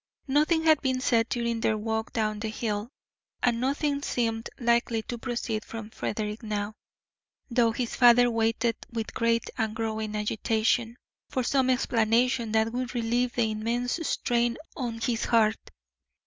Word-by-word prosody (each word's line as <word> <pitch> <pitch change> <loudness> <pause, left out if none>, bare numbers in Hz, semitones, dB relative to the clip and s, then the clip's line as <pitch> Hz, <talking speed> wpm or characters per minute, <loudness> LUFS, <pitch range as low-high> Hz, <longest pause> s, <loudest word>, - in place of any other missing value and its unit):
Nothing 305 +4 +3
had 315 -2 +5
been 260 -2 0
said 230 -3 +2
during 235 -1 -1
their 220 -1 +2
walk 220 +1 -2
down 215 -2 -1
the 220 - -3
hill, 215 0 -3 0.5
and 235 -1 +2
nothing 280 +2 0
seemed 225 -4 -1
likely 235 -2 +1
to 240 +1 -6
proceed 235 -3 -3
from 225 -1 -8
Frederick 210 0 -3
now, 210 -1 -3 0.8
though 235 -1 +3
his 240 +1 -3
father 245 0 +6
waited 225 0 +1 0.2
with 225 -2 -4
great 230 0 +1
and 220 -1 -1
growing 220 -1 -3
agitation 225 +2 0 0.3
for 255 - -1
some 260 +1 +2
explanation 235 -1 +2
that 220 +1 +2
would 250 0 -3
relieve 240 +1 0
the 225 -2 +1
immense 235 +6 -1
strain 240 -6 0 0.2
on 235 -5 -4
his 235 -1 0
heart. 220 -2 +2
230 Hz, 150 wpm, -27 LUFS, 220-245 Hz, 0.8 s, father